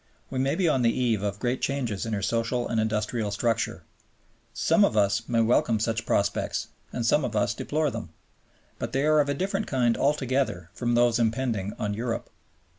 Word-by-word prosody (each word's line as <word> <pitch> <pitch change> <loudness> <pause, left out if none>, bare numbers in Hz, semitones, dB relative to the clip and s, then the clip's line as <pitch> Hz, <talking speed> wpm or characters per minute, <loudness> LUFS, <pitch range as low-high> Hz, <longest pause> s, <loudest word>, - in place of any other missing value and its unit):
We 130 - -2
may 135 +1 +1
be 185 -3 +1
on 135 -5 +2
the 115 - +4
eve 115 -5 +1
of 100 -1 -2
great 120 +3 -1
changes 120 -7 -2
in 110 - -3
her 100 -2 -2
social 115 +3 0
and 115 -1 0
industrial 110 0 -1
structure. 115 +3 -1 0.7
Some - - +3
of 110 - +2
us 100 -1 +2
may 115 -1 +3
welcome 115 -1 +2
such 115 +1 -1
prospects 100 0 0 0.2
and 120 - -3
some 150 +5 +3
of 115 -4 -3
us 105 - +2
deplore 150 -1 -1
them. 110 -7 -6 0.7
But - - -4
they 135 +2 +1
are 155 0 +4
of 145 -1 +2
a 140 - 0
different 195 +7 -2
kind 120 -3 +2
altogether 130 - 0
from 120 -1 -1
those 120 -1 +3
impending 115 -3 0
on 105 -1 -2
Europe. 115 +2 -3
115 Hz, 190 wpm, -26 LUFS, 110-130 Hz, 0.7 s, the